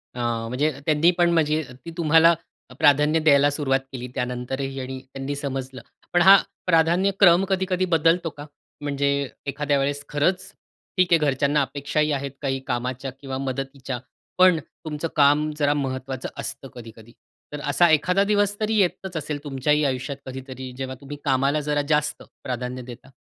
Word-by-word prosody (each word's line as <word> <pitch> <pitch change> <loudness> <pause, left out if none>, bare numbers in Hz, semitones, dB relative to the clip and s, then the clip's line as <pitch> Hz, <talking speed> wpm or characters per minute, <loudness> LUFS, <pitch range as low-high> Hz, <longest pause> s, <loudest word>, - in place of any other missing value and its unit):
अ, 125 - -6 0.3
म्हणजे 145 +6 0
त्यांनी 155 +3 +4
पण 175 -1 +4
म्हणजे 155 -2 +2 0.2
ती 165 - -6
तुम्हाला 165 +1 +5 0.5
प्राधान्य 150 +2 +4
द्यायला 145 -2 +5
सुरुवात 135 -2 0
केली 125 -1 -6
त्यानंतरही 130 +1 -4
त्यांनी 135 +1 -4
समजलं. 135 -2 -5 0.3
पण 175 - +4
हा 195 +2 +9 0.3
प्राधान्यक्रम 180 +2 +4
कधी-कधी 185 -1 0
बदलतो 165 0 +2
का? 145 0 -10 0.4
म्हणजे 140 -1 0 0.4
एखाद्या 145 +1 0
वेळेस 145 +1 -1
खरंच 180 +6 0 0.5
ठीक 180 -1 +3
आहे 170 - +7
घरच्यांना 140 +2 +1
अपेक्षाही 145 +2 -1
आहेत 140 -1 -2
काही 135 -1 -1
कामाच्या 125 +2 -3
किंवा 135 -2 -5
मदतीच्या. 135 -1 -4 0.4
पण 185 -3 +6
तुमचं 155 +2 -6
काम 150 +1 +4
जरा 145 -1 +2
महत्त्वाचं 130 -2 -4
असतं 135 - -6
कधी-कधी. 115 -1 -12 0.4
तर 150 - -4
असा 175 +4 +4
एखादा 180 +6 +3
दिवस 205 0 +1
तरी 220 +1 0
येतच 185 -1 -1
असेल 150 -1 -4
तुमच्याही 150 +2 +1
आयुष्यात 135 +1 -2
कधीतरी 130 0 -8
जेव्हा 130 -1 -5
तुम्ही 145 +1 -8
कामाला 140 +2 +2
जरा 145 0 0
जास्त 150 0 0 0.2
प्राधान्य 125 0 -4
देता. 125 +2 -11
145 Hz, 145 wpm, -23 LUFS, 135-160 Hz, 0.5 s, हा